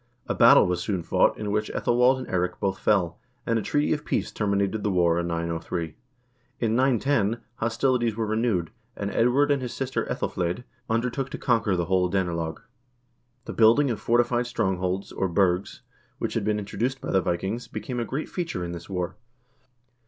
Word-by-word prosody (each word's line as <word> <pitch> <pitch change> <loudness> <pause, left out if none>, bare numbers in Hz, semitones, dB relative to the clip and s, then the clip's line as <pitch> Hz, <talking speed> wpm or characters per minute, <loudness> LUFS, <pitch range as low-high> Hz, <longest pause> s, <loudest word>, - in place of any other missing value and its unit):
A - - -1
battle - - +7
was 90 -1 -1
soon 95 -3 -2
fought, - - +2
in 105 -1 -3
which 105 +1 0
^Ethelwald 125 +2 +3
and 130 - -6
Eirik 90 -1 -1
both 95 -1 -1
fell, 95 -6 +1 0.3
and 115 -1 +1
a - - -2
treaty 145 +8 +1
of 150 -1 -3
peace - - -1
terminated 100 0 0
the 105 - 0
war 85 -3 +3
in 85 - -2
903. 85 -1 -3 0.6
In 115 -1 +1
910 120 -3 +2 0.2
hostilities 115 0 +1
were 115 0 -1
renewed, 110 -6 0 0.2
and 100 0 -3
Edward 135 +5 +3
and 140 -2 +2
his 125 -2 -5
sister 135 0 -2
vEthelflaed 90 +6 -2 0.3
undertook 125 +4 -1
to - - -5
conquer 110 -5 +1
the 85 -1 0
whole 90 0 +2
Danelag. 85 -4 -2 0.8
The - - -5
building 120 +5 +5
of 110 - -3
fortified 120 +1 +2
strongholds, 95 -4 -1
or 95 - -1
burghs, 90 +1 0 0.3
which - - -3
had - - -1
been 105 0 +1
introduced 110 +6 -2
by - - -4
the 95 - +3
Vikings, 95 +7 -2
became 125 -2 -5
a - - 0
great 135 +6 -4
feature 165 - -3
in 85 - -5
this 85 +1 -8
war. 90 -2 -3
105 Hz, 180 wpm, -26 LUFS, 90-120 Hz, 0.8 s, battle